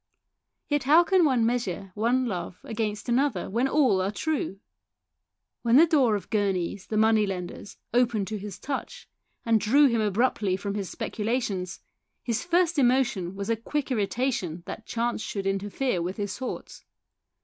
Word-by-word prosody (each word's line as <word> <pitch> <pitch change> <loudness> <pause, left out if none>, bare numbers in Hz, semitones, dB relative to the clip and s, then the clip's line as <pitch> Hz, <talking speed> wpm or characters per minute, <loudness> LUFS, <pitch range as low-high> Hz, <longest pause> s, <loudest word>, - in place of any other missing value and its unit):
Yet, 290 -3 0
how 315 +5 +7
can 370 -1 +3
one 255 -6 +3
measure 200 -5 -2
one 240 +5 +1
love 180 -5 -4
against 215 -1 -3
another 245 -6 0
when 240 +5 +1
all 260 -10 +3
are 190 - 0
true? 215 -3 -2 1.0
When 235 0 +3
the 310 +5 +8
door 275 -9 +3
of 205 - -6
Gurneys', 195 -3 -1
the 215 - -2
money 220 -1 +4
lenders, 185 +1 -6 0.2
opened 235 -5 +2
to 215 -1 -3
his 200 -1 -7
touch, 290 - -5 0.4
and 225 -2 +3
drew 275 +8 +5
him 235 -4 +2
abruptly 210 -2 +1
from 200 +1 -4
his 200 -3 -3
speculations, 210 -5 -3 0.4
his 235 -2 -1
first 345 -2 +2
emotion 240 -8 +2
was 200 +3 -3
a - - +3
quick 270 +5 -3
irritation 205 -6 -1
that 225 - -8
chance 235 -1 -1
should 200 -2 -4
interfere 195 +2 -1
with 180 +3 -3
his 205 -2 -3
thoughts. 260 - -6
225 Hz, 160 wpm, -26 LUFS, 195-260 Hz, 1.0 s, the